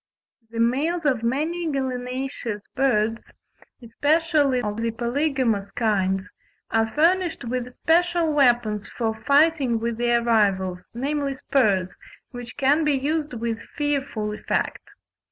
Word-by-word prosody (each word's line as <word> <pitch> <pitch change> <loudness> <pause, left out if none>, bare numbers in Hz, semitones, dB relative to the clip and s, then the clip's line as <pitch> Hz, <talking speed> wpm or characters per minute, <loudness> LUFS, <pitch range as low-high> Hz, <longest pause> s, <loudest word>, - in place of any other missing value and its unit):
The 230 0 -6
males 295 +9 +1
of 260 -6 +2
many 315 +8 -1
gallinaceous 255 -4 -3
birds, 230 -4 0 0.5
especially 290 +2 +2
of 210 0 -3
the 230 0 -1
polygamous 235 -3 0
kinds, 195 -3 0 0.4
are 225 0 +2
furnished 345 +1 +2
with 250 +1 -4
special 340 -1 +3
weapons 240 -7 +2
for 225 -2 -2
fighting 280 +1 +2
with 230 0 -3
their 240 0 +2
rivals, 190 -5 +1
namely 280 +2 -1
spurs, 200 -9 +1 0.4
which 245 -1 -9
can 290 +3 +3
be 300 -1 +2
used 295 +2 -1
with 230 -1 -3 0.2
fearful 275 -8 -1
effect. - - -2
250 Hz, 120 wpm, -24 LUFS, 225-290 Hz, 0.5 s, special